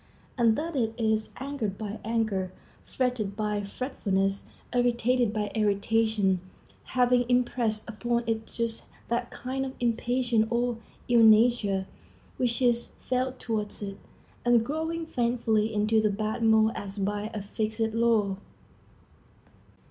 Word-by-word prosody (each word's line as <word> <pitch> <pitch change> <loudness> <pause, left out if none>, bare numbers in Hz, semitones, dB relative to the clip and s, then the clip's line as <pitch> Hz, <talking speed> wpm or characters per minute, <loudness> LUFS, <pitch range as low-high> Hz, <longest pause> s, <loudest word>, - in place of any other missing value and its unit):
And 230 -3 +4
thus 325 +1 -3
it 225 -4 0
is 220 -2 +1
angered 255 -8 -3
by 215 0 -5
anger, 220 -5 -1 0.3
fretted 245 -6 -1
by 210 -1 -1
fretfulness, 200 -3 -2 0.3
irritated 245 -1 +2
by 210 -2 -2
irritation, 210 -2 +2 0.4
having 250 -1 +3
impressed 240 -3 +1
upon 235 +1 -1
it 225 -1 -2
just 230 -1 -3 0.2
that 240 +1 -1
kind 265 +1 -4
of 265 0 -5
impatience 240 -1 +1
or 240 0 0 0.3
ill 240 -1 +5
nature 215 -3 +5 0.5
which 245 0 0
is 235 -1 +1
felt 255 +1 -1
towards 215 -3 -3
it, 195 -1 -5 0.5
and 240 -2 +4
growing 320 +3 -2
faithfully 235 -5 +1
into 215 +1 +2
the 215 - +2
bad 215 +3 -2
mold 220 -1 +5
as 200 0 -6
by 205 +2 -1
a 215 - -4
fixed 220 +2 -2
law. 225 -4 +2
225 Hz, 125 wpm, -28 LUFS, 215-245 Hz, 0.5 s, ill